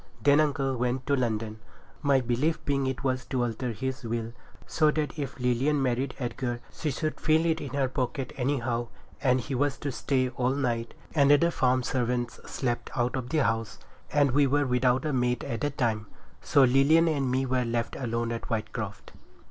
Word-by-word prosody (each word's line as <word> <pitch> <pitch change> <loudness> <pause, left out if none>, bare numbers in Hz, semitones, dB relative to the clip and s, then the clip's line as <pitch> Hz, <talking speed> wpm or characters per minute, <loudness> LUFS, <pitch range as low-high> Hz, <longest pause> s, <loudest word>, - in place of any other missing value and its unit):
Then 145 +1 +6
uncle 140 -3 +1
went 125 +1 -1
to 140 - +2
London, 110 -3 -2 0.4
my 140 -3 +3
belief 130 +7 0
being 140 -2 +1
it 130 0 -3
was 130 -1 0
to 125 -2 -1
alter 120 +1 -2
his 130 +3 -4
will, 115 0 -3 0.3
so 155 -1 +2
that 150 0 -2
if 140 -2 -4
Lilian 125 +4 +1
married 130 0 0
Edgar, 120 -1 -3
she 155 - -2
should 155 +3 -3
feel 160 +1 +3
it 160 -1 +1
in 140 - -5
her 135 -2 +2
pocket, 130 0 -3
anyhow, 125 -3 -1 0.3
and 130 -2 +3
he 135 +3 -5
was 140 +2 +1
to 145 - -3
stay 130 0 0
all 125 +1 0
night, 120 -4 -2 0.2
and 140 -3 +4
the 145 +4 +5
farm 130 -4 +2
servants 120 -1 -1
slept 120 -3 -2
out 120 +1 0
of 125 -2 -4
the 150 +1 +2
house, 115 -2 -1 0.3
and 145 -2 +3
we 140 +2 +4
were 145 +2 +2
without 125 +2 +2
a 150 - 0
maid 125 -1 +1
at 115 -1 -4
the 145 - +1
time. 115 -6 -1 0.3
So 140 - +4
Lilian 140 +6 +5
and 140 -5 +1
me 130 +1 +1
were 130 -1 +1
left 115 0 -2
alone 115 -2 -2
at 115 - -4
Whitecroft. 110 -2 -4
130 Hz, 190 wpm, -28 LUFS, 120-140 Hz, 0.4 s, Then